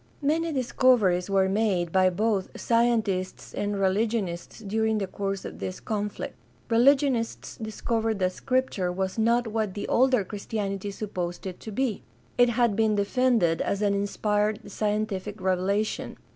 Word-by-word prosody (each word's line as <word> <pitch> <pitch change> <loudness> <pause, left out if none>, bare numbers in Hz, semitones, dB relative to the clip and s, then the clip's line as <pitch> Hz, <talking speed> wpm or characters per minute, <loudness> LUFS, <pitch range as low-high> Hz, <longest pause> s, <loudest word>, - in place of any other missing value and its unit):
Many 325 +3 +1
discoveries 240 - +3
were 195 -1 +3
made 190 -4 +1
by 185 0 +4
both 200 +1 -1
scientists 225 -6 0
and 205 -1 -2
religionists 195 -2 -1
during 220 +1 0
the 200 - -1
course 195 0 -4
of - - -7
this 185 - -4
conflict. 210 -1 -3 0.4
Religionists 255 0 +2
discovered 225 0 -2
that 185 -1 +1
Scripture 230 -5 -1
was 190 +3 -2
not 235 +2 +3
what 220 -3 -2
the 205 - -4
older 255 -3 +3
Christianity 200 0 -4
supposed 185 -4 -4
it 185 -2 -6
to 220 - -8
be. 235 -1 -1 0.3
It 245 0 +5
had 235 -3 +2
been 220 -1 +2
defended 205 -4 +2
as 200 +1 -1
an 200 -1 +3
inspired 210 +1 -1
scientific 210 -1 -2
revelation. 190 +3 -1
210 Hz, 140 wpm, -26 LUFS, 190-230 Hz, 0.4 s, It